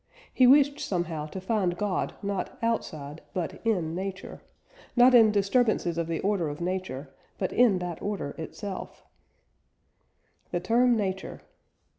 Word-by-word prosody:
He 255 - +5
wished 285 +2 +5
somehow 170 -5 -2
to 190 - -7
find 190 -2 0
God 200 -2 -1
not 200 -1 -3
outside, 155 -10 -2
but 175 -3 -4
in 180 -8 0
Nature; 190 +1 -6 0.5
not 250 +1 +6
in 225 -3 +7
disturbances 205 -3 +2
of 165 - -1
the 165 -1 -2
order 195 -5 0
of 145 - -6
Nature, 175 -7 -4 0.2
but 185 - -2
in 240 -6 +4
that 175 -2 -5
order 200 -8 -3
itself. 195 +4 -7 1.5
THE 175 - -1
TERM 235 +6 +3
NATURE. 190 -2 -3
190 Hz, 135 wpm, -27 LUFS, 170-220 Hz, 1.5 s, in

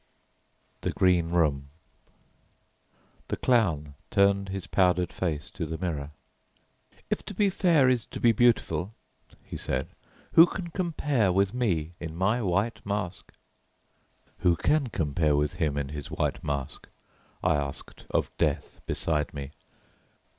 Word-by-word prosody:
THE - - -1
GREEN 90 -3 +3
ROOM 75 -5 +1 1.6
The - - -1
Clown 85 - +1 0.2
turned 100 0 +3
his 95 -1 -4
powdered 90 -2 +2
face 80 -5 -3
to 80 - -4
the 80 +1 -4
mirror. 80 -6 -3 1.0
"If - - -1
to - - -7
be 205 -2 +3
fair 170 -8 +4
is 125 -3 +1
to - - -7
be 120 - +5
beautiful," 110 -5 +2 0.5
he - - -6
said, - - -2 0.4
"who 165 +2 +9
can 175 -2 -5
compare 150 - +1
with 95 +2 +2
me 90 -10 0
in 80 -2 -6
my 100 +7 +1
white 100 +3 0
mask?" 100 -3 -4 1.0
"Who 85 -1 +3
can 140 - +1
compare 75 - +1
with 75 0 0
him 75 -3 0
in 70 -1 -2
his 75 -1 -6
white - - -2
mask?" 70 -2 -4 0.5
I - - +4
asked 70 -2 -5
of - - -1
Death - - -1
beside 75 -1 -1
me. 70 0 -6
90 Hz, 135 wpm, -27 LUFS, 75-115 Hz, 1.6 s, who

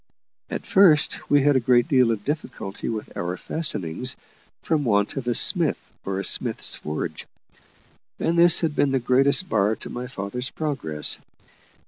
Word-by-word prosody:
At - - -5
first 170 -7 +3
we 145 -1 +4
had 145 0 +3
a - - +4
great 120 0 +3
deal 130 -3 +3
of 110 -3 -2
difficulty 130 -9 -5
with 110 -2 -6
our 90 +1 -3
fastenings, 95 - -1 0.5
from 155 -3 0
want 105 -4 +1
of 135 -3 -5
a 120 - +1
smith - - +1
or 95 -1 -3
a - - -3
smith's - - +1
forge; 75 0 -5 0.9
and 170 - 0
this 170 0 +6
had 160 -3 -1
been 145 - +2
the 135 - +1
greatest 135 +8 +2
bar 105 - +1
to - - -10
my 125 +1 -5
father's 125 +2 -4
progress. 135 - -2
125 Hz, 160 wpm, -23 LUFS, 105-145 Hz, 0.9 s, this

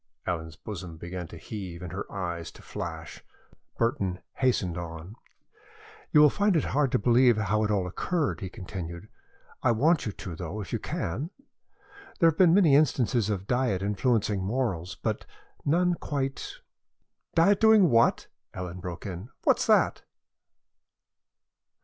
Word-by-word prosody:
Ellen's 80 -3 -3
bosom 90 -6 -8
began 90 +1 -6
to - - -11
heave 95 -5 -7
and 90 - -6
her 95 +2 -6
eyes 85 -4 -4
to - - -15
flash. 80 -4 -7 0.5
Burton 100 -7 0
hastened 110 -9 +1
on. 85 +3 -7 1.0
"You 150 - +7
will 150 - +8
find 205 -2 +2
it 160 - +3
hard 140 -3 +1
to - - +5
believe 120 +1 +4
how 105 0 +1
it 105 - 0
all 100 -3 +1
occurred," 150 - -1
he 95 - -4
continued. 90 -1 -7 0.5
"I - - +3
want 150 +5 +2
you - - -1
to, 90 -4 -7
though, 90 +5 -5
if 95 -5 -7
you - - 0
can. 125 - -3 0.9
There 165 - +5
have 160 - -13
been 180 -3 +7
many 175 -8 +5
instances 125 -6 +2
of 95 -3 -2
diet 125 -5 0
influencing 105 -1 +1
morals, 95 -6 -2
but - - -3 0.4
none 175 +4 +3
quite 135 -5 -3 0.4
" - - -45
"Diet 195 +4 +5
doing 220 -6 +6
what?" 115 0 +4 0.3
Ellen 90 -1 -5
broke 90 0 -7
in. 95 +3 -6
"What's - - +3
that?" - - +3
105 Hz, 150 wpm, -28 LUFS, 90-135 Hz, 1.0 s, will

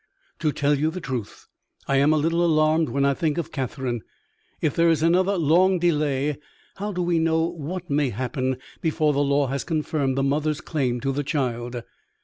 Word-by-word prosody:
"To 155 -2 +1
tell 145 0 +1
you 155 +2 +2
the 180 +3 -5
truth, 125 - -5 0.4
I 140 - +2
am 140 +3 +4
a 155 - +3
little 165 +3 +1
alarmed 155 -2 +3
when 140 +3 +1
I 140 - +3
think 155 +2 -1
of 170 - -3
Catherine. 130 -3 -3 0.6
If 150 - 0
there 170 0 +4
is 160 -1 +2
another 185 +4 +3
long 180 +4 +4
delay, 150 -4 +1 0.4
how 205 +2 -3
do 180 -2 -2
we 170 -1 +1
know 160 0 +2
what 170 +2 -4
may 145 -3 +1
happen 130 +3 -2 0.2
before 155 -2 +1
the 140 - 0
law 140 0 +2
has 135 +1 -2
confirmed 150 -4 -1
the 135 - +1
mother's 150 +2 0
claim 130 -8 -2
to 135 - 0
the 145 +2 -2
child? 120 -4 -2
150 Hz, 190 wpm, -24 LUFS, 135-165 Hz, 0.6 s, am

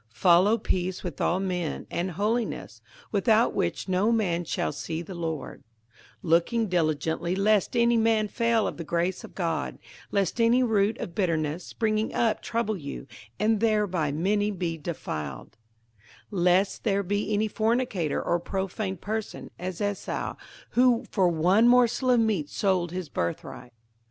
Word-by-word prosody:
58:012:014 - - -23
Follow 185 - +5
peace 185 -3 -2
with 175 -6 -5
all 180 - +2
men, 180 -4 -2
and 175 +2 -1
holiness, 220 +6 -2 0.3
without 220 +3 +3
which - - -1
no 190 +4 +2
man 180 -7 +1
shall 165 - -2
see 160 +3 -4
the 190 - -8
Lord: 160 -5 -4
58:012:015 - - -29 0.6
Looking 175 +8 +2
diligently 160 0 0
lest 210 +3 +2
any 235 0 +4
man 220 -1 +2
fail 230 +1 +1
of - - -3
the 170 - -5
grace 170 +3 -1
of - - -12
God; 165 -5 -2 0.3
lest 200 +3 0
any 240 +3 +4
root 215 -1 +2
of 170 - -6
bitterness 165 -3 -1
springing 215 -1 -1
up 225 -2 +1
trouble 230 -2 -1
you, 140 -5 -7 0.3
and 220 0 +2
thereby 205 -9 +1
many 205 +7 +1
be 175 -4 -2
defiled; 75 - -6 0.8
58:012:016 180 -3 0
Lest 185 +2 +2
there 200 -2 +1
be 205 +2 -1
any 210 +1 +2
fornicator, 220 - 0
or 175 - +1
profane 190 +2 -3
person, 215 +4 -5
as 185 +1 -5
Esau, 205 -1 -2 0.4
who 245 -1 +3
for 190 -4 +3
one 180 +7 +4
morsel 250 +1 +4
of 245 -1 +5
meat 210 -10 +1
sold 185 -4 0
his 180 -2 -4
birthright. 120 +3 -4
195 Hz, 155 wpm, -27 LUFS, 170-220 Hz, 0.8 s, Follow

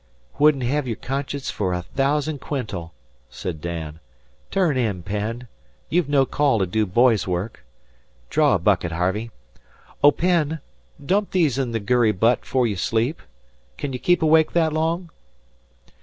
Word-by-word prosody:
"'Wouldn't 145 -3 +4
hev 135 +2 0
your 115 - -2
conscience 140 +2 -4
fer 95 -3 -1
a 90 0 -2
thousand 140 - -1
quintal," 100 - -4 0.4
said 85 -5 -6
Dan. 80 -2 -5 0.5
"Turn 180 -7 +1
in, 105 -8 -1
Penn. 105 +6 -4 0.4
You've 170 -3 +1
no 140 -2 +4
call 140 -3 +2
to 95 - +1
do 105 +3 0
boy's 115 +2 +3
work. 90 +5 -3 0.7
Draw - - +4
a - - +3
bucket, 85 -2 +1
Harvey. 95 +7 -1 0.7
Oh, 145 - +9
Penn, 160 -2 +1 0.5
dump 200 +5 +1
these 155 -8 +1
in 130 -3 -1
the 115 - -1
gurry 115 0 +2
butt 115 +5 +2
'fore 130 -2 +1
you 105 -4 -1
sleep. 115 - 0 0.6
Kin 140 -2 -4
you 125 - -4
keep 175 +2 +2
awake 160 0 +4
that 160 -2 +2
long?" 165 +2 -1
125 Hz, 155 wpm, -23 LUFS, 105-150 Hz, 0.7 s, Oh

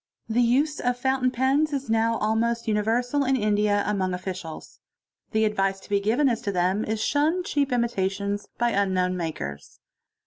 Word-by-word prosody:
The 230 +2 +1
use 275 +6 +2
of 245 0 0
fountain 260 0 +1
pens 270 +5 +1
is 275 -1 -2
now 225 +1 +2
almost 230 +2 0
uni 210 -1 +2
versal 245 +5 0
in 270 - +3
India 210 -2 +2
among 190 -3 0
officials. 180 -3 -7 0.5
The 220 -1 +2
advice 195 -2 0
to - - -16
be 200 -1 +2
given 230 +8 +2
as 235 -3 0
to 200 - -2
them 185 +3 +1
is, 220 0 -2
to - - 0
shun 315 +5 +1
cheap 285 -5 0
imitations 205 -4 -1
by 240 0 +1
unknown 185 -3 +1
makers. 110 - -5
220 Hz, 175 wpm, -25 LUFS, 200-250 Hz, 0.5 s, in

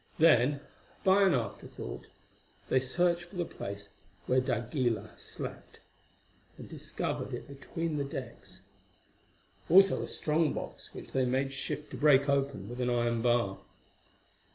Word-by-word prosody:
Then, 145 -3 +5 0.4
by 190 +1 +5
an 190 -6 +5
afterthought, 110 - -5 0.6
they 130 - +4
searched 175 +6 +1
for 175 - -15
the 175 -1 -1
place 100 -8 -7 0.4
where 130 +1 +3
d'Aguilar 120 -3 -1
slept, - - -8 0.8
and - - -9
discovered - - -4
it - - -8
between 150 +2 -3
decks; 130 -4 -8 1.1
also 195 +3 +7
a - - -4
strong 155 +1 +1
box - - -6
which - - -9
they 130 -1 +2
made 135 +2 0
shift 150 +2 -4
to - - -6
break 140 -2 +5
open 140 -8 0
with 120 +2 -5
an 125 - +1
iron 120 -1 +1
bar. 120 -5 +2
135 Hz, 130 wpm, -31 LUFS, 120-155 Hz, 1.1 s, also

